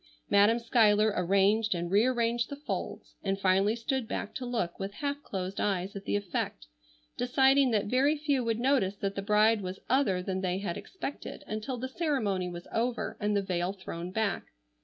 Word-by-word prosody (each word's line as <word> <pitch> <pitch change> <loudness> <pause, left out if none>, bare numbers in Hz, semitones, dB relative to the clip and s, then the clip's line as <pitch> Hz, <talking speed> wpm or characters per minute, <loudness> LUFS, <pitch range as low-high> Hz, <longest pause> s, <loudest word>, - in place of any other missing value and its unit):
Madam 205 +3 +5
Schuyler 215 -3 +3
arranged 195 +4 +2
and 175 0 -3
rearranged 235 +2 +2
the 285 - -5
folds, 290 +1 -5
and 195 0 -1
finally 195 +3 +3
stood 240 +1 -2
back 215 - -4
to 250 - -5
look 225 -8 -2
with 195 +1 -4
half 285 0 -3
closed 190 -5 -4
eyes 195 0 -1
at 200 - -7
the - - 0
effect, 185 - -3 0.5
deciding 265 +2 +4
that 215 -4 +1
very 270 +7 +2
few 290 -3 0
would 230 -1 -1
notice 245 -7 +2
that 195 0 -3
the 195 - -3
bride 210 +2 +3
was 185 0 -5
other 205 -9 +2
than 190 0 -2
they 185 -1 0
had 190 -3 -3
expected 320 -6 -7
until 215 +4 -4
the 255 +2 -3
ceremony 260 - -1
was 175 0 -8
over 235 +1 -1
and 210 -1 +1
the 200 - 0
veil 180 0 -1
thrown 180 -3 -6
back. 220 +1 -1
210 Hz, 180 wpm, -29 LUFS, 195-245 Hz, 0.5 s, Madam